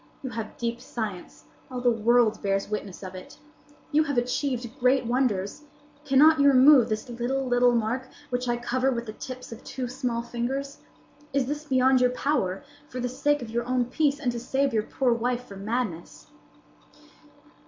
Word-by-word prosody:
You 260 - -4
have 225 -2 -6
deep 235 0 -3
science. 210 -6 -6 0.3
All 255 -1 -4
the 245 0 +3
world 230 -1 +3
bears 195 0 0
witness 205 -2 -5
of 185 0 -7
it. 185 0 -11 0.5
You 305 +1 +4
have 285 -3 -2
achieved 250 0 -1
great 255 +1 +3
wonders. 235 -1 0 0.4
Cannot 295 +3 +6
you 280 - +5
remove 270 -1 +7
this 215 +4 -2
little, 245 +3 -2
little 245 -1 +3
mark, 235 +3 -1 0.2
which 250 0 -1
I 240 - +1
cover 250 +2 0
with 235 -2 -3
the 215 - -7
tips 255 +2 -8
of 230 - -9
two 255 -2 -4
small 245 -2 -2
fingers? 265 +4 -4 0.5
Is 275 -2 +2
this 295 +3 -4
beyond 260 -2 +3
your 250 - +5
power, 250 -5 -1 0.3
for 255 - -6
the 250 0 -1
sake 285 +2 0
of 225 - -8
your 235 +1 -1
own 250 -1 +1
peace, 290 0 +1
and 255 -5 0
to 240 - -4
save 270 +2 0
your 220 - +2
poor 245 +3 0
wife 245 +1 -1
from 195 0 -9
madness?" 215 -7 -3
245 Hz, 180 wpm, -26 LUFS, 230-265 Hz, 0.5 s, remove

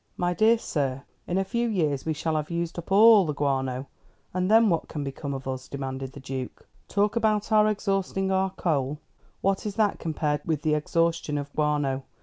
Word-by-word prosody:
"My 175 0 0
dear 220 +5 +4
sir, 135 - -2 0.2
in 180 - -1
a 195 - +2
few 235 +3 -1
years 155 - 0
we 160 - +1
shall 155 +1 -2
have 150 -1 -2
used 170 0 -3
up 170 - -10
all 215 +1 +8
the 150 -4 -3
guano, 135 -2 -1 0.5
and 185 +1 0
then 225 +1 +6
what 170 -5 0
can 150 -3 -4
become 140 +1 -5
of 135 -1 -5
us?" 130 0 -4
demanded 135 -1 -5
the - - -9
Duke. 130 -1 -6 0.2
"Talk 205 +2 +1
about 215 -2 +1
our 215 0 +5
exhausting 195 -2 -1
our 190 0 +2
coal! 150 -6 -1 0.4
What 195 0 +1
is 200 - -4
that 215 -3 +1
compared 150 -2 -1
with 155 -3 -2
the 155 - +2
exhaustion 165 0 0
of 145 0 -5
guano? 145 -3 0
160 Hz, 195 wpm, -26 LUFS, 140-195 Hz, 0.5 s, all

